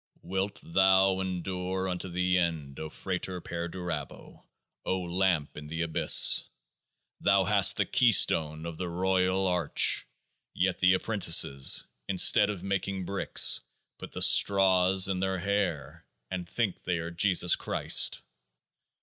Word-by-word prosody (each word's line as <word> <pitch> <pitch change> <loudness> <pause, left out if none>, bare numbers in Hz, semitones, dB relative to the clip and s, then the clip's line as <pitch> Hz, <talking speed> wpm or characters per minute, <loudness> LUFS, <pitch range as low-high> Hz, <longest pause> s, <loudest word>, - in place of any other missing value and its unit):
73 - - -16
Wilt 95 +1 -3
thou 95 +2 +2
endure 95 0 -5
unto 90 0 -5
The 90 +1 -1
End, 80 -5 -4
O 80 - -7
FRATER 90 +2 -5
PERDURABO, 85 -3 -8 0.4
O 95 - -3
Lamp 90 -3 -2
in 75 0 -10
The 80 +2 -4
Abyss? 80 -1 +4 0.7
Thou 100 -1 +2
hast - - +3
the - - 0
Keystone 80 -9 +2
of 85 -1 -8
the 90 -2 -5
Royal 95 +1 -1
Arch; 90 -5 +1 0.5
yet 95 -1 -1
the 90 0 +3
Apprentices, 85 -9 +1 0.2
instead 100 +3 +4
of 100 -4 -6
making 95 -1 -4
bricks, 100 +2 +2 0.4
put - - -11
the - - +1
straws 95 -1 +4
in 95 -2 -3
their 95 0 -2
hair, 85 -5 -4 0.2
and 90 -2 -6
think 110 -3 -3
they 90 -1 -2
are 85 +1 -6
Jesus 90 0 +3
Christ - - +1
90 Hz, 130 wpm, -27 LUFS, 85-95 Hz, 0.7 s, Abyss